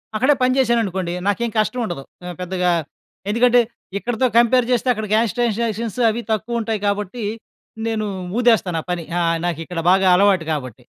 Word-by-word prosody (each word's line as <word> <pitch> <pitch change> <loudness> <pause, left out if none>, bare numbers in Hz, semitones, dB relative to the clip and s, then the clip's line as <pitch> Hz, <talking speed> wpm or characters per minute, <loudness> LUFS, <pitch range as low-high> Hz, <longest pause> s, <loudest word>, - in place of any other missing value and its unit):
అక్కడే 260 +7 +4
పని 255 0 +3
జేశాననుకోండి. 205 -9 +1
నాకేం 230 +4 0
కష్టం 215 +4 +1
ఉండదు. 175 -9 -5 0.2
ఆహ్, 180 -1 -6
పెద్దగా 180 0 -1 0.6
ఎందుకంటే, 245 +3 +4 0.4
ఇక్కడితో 240 +4 -1
కంపేర్ 240 +1 +4
జేస్తే, 250 0 +1
అక్కడ 220 -1 -4
క్యాష్ 220 -3 +2
ట్రాన్సాక్షన్స్ 230 -2 -1
అవి 225 +2 -2
తక్కువ 225 +2 -1
ఉంటాయి 220 -1 -2
కాబట్టి, 205 +3 -2 0.6
నేను 220 -1 -1 0.3
ఊదేస్తాను. 215 -9 +2
ఆ - - -19
పని 175 -1 -2 0.2
ఆహ్, 165 -1 +1
నాకిక్కడ 165 0 -3
బాగా 190 +1 +4
అలవాటు 190 -3 +3
కాబట్టి. 130 -7 -5
215 Hz, 155 wpm, -20 LUFS, 180-235 Hz, 0.6 s, అక్కడే